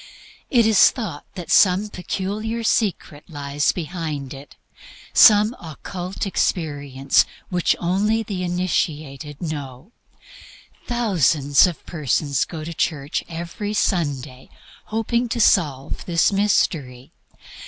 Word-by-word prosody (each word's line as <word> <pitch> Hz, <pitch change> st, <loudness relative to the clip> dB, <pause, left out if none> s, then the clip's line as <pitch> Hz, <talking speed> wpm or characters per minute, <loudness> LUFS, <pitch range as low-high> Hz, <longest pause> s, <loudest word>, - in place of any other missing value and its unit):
It 235 Hz, -4 st, +4 dB
is 220 Hz, -3 st, +6 dB
thought 195 Hz, -, -6 dB, 0.2 s
some 195 Hz, +2 st, +4 dB
peculiar 210 Hz, +5 st, -4 dB
secret 190 Hz, -9 st, -1 dB
lies 145 Hz, -1 st, -1 dB
behind 155 Hz, -5 st, -5 dB
it, 140 Hz, +1 st, -12 dB, 0.6 s
some 210 Hz, +2 st, +6 dB
occult 175 Hz, +4 st, -6 dB
experience 145 Hz, -8 st, +1 dB, 0.3 s
which 180 Hz, -2 st, +1 dB
only 210 Hz, +6 st, +1 dB
the 200 Hz, -4 st, -5 dB
initiated 155 Hz, -5 st, -2 dB
know. 145 Hz, -, -6 dB, 1.0 s
Thousands 170 Hz, -, +3 dB
of 175 Hz, -, -7 dB
persons 145 Hz, -3 st, 0 dB
go 160 Hz, -3 st, -7 dB
to 165 Hz, +2 st, -6 dB
church 150 Hz, -2 st, -2 dB
every 175 Hz, +5 st, -5 dB
Sunday 145 Hz, -10 st, -2 dB, 0.4 s
hoping 235 Hz, +2 st, -1 dB
to 235 Hz, -, -2 dB
solve 145 Hz, -, +2 dB
this 170 Hz, +1 st, +2 dB
mystery. 150 Hz, -10 st, 0 dB
170 Hz, 100 wpm, -22 LUFS, 145-205 Hz, 1.0 s, is